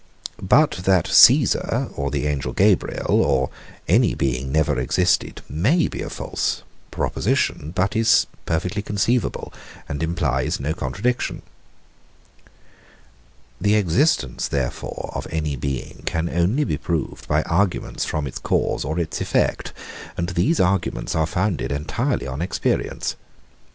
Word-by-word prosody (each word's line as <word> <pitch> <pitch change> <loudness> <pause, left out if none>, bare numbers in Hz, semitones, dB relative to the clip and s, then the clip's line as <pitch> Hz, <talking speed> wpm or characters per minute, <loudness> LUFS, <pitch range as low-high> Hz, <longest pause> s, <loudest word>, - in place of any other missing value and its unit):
But 145 - +4
that 95 -3 +4
Caesar, - - +5
or 70 0 -2
the 70 +1 -2
angel 75 -2 -2
Gabriel, - - +2
or 65 -1 +1 0.4
any - - +3
being 65 0 -1
never 75 -2 +2
existed, 60 - +1
may 120 - +2
be - - -6
a - - -4
false - - -2 0.3
proposition, 75 - -1
but 100 +2 +1
still 110 +1 +1
is 115 - +5 0.2
perfectly 90 +5 -1
conceivable, 105 +4 -1 0.3
and 70 +1 -4
implies 80 -6 0
no 70 +3 -1
contradiction. 100 - -2 2.2
The 105 +2 +3
existence, 100 - +1
therefore, 65 -3 -3
of - - -4
any 75 -3 -2
being 70 0 -4
can 80 +1 0
only 95 - +1
be 75 - -1
proved 80 +1 -3
by 75 +1 +2
arguments 95 +2 0
from 75 -2 -2
its 65 - -6
cause - - 0
or 80 - -3
its 85 -3 -2
effect; - - 0 0.5
and 85 0 -1
these 90 - +1
arguments 95 -1 0
are 80 -1 +1
founded 90 -3 -1
entirely 70 -3 -1
on 65 +3 -4
experience. 90 - -1
80 Hz, 130 wpm, -22 LUFS, 70-100 Hz, 2.2 s, Caesar